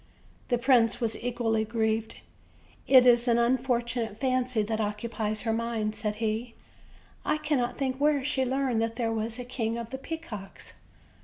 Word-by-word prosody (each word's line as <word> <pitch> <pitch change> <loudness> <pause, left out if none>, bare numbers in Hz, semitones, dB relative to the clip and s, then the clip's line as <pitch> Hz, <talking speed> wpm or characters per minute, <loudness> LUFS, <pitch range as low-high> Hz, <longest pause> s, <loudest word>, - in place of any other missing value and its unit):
The 245 - +2
prince 240 -2 +3
was 230 -3 -1
equally 230 -3 0
grieved. 220 0 -1 0.7
"It 255 -2 +8
is 240 0 +5
an 235 -1 +4
unfortunate 240 -2 0
fancy 255 -3 +1
that 220 +1 -1
occupies 215 0 -2
her 225 -2 0
mind," 225 -2 -1
said 210 -1 -2
he; 225 +2 -2 0.7
"I - - +1
cannot 285 -6 -1
think 260 -2 -1
where 290 -2 +3
she 275 -2 +1
learned 260 -3 0
that 225 0 -1
there 230 -2 -1
was 225 +1 -2
a 250 - -6
King 235 -2 -2
of 235 0 -6
the 265 - -5
Pea 325 +4 -4
cocks." 210 -12 -8
235 Hz, 165 wpm, -28 LUFS, 225-255 Hz, 0.7 s, It